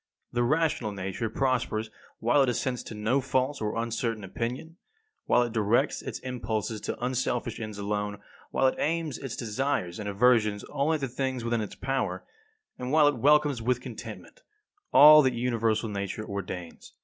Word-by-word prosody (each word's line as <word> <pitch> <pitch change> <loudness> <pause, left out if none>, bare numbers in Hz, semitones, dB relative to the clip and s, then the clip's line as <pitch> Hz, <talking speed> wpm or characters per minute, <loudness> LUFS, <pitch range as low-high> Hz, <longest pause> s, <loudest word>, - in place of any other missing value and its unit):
The 120 - +1
rational 150 -3 +1
nature 95 +3 -3
prospers 115 -3 -1 0.3
while 120 +5 +3
it 135 - +3
assents 125 +1 -1
to 110 - -7
no 110 +6 +1
false 130 +1 0
or 105 -1 -2
uncertain 115 -1 -2
opinion, 120 - -5 0.5
while 120 - +4
it 120 -2 -4
directs 110 +1 +1
its - - -5
impulses 110 -4 -3
to - - -4
unselfish 125 -1 -1
ends 110 -2 -6
alone, 105 0 -2 0.3
while - - +1
it 130 - +2
aims 160 -3 -1
its 135 -4 -5
desires 115 -6 -2
and 105 -1 -4
aversions 105 -1 +3
only 150 +3 +1
at 155 - -4
the 135 - -1
things 130 0 -3
within 115 -1 0
its 105 - -6
power, 135 -1 -2 0.6
and 125 +1 -4
while 155 -1 +6
it 145 -3 +2
welcomes 145 -1 +3
with 125 +2 +1
contentment 125 - -9 0.5
all 150 +1 +10
that 130 -3 +1
universal 115 -2 0
Nature 100 +1 -4
ordains. 90 -4 -7
120 Hz, 165 wpm, -28 LUFS, 110-135 Hz, 0.6 s, all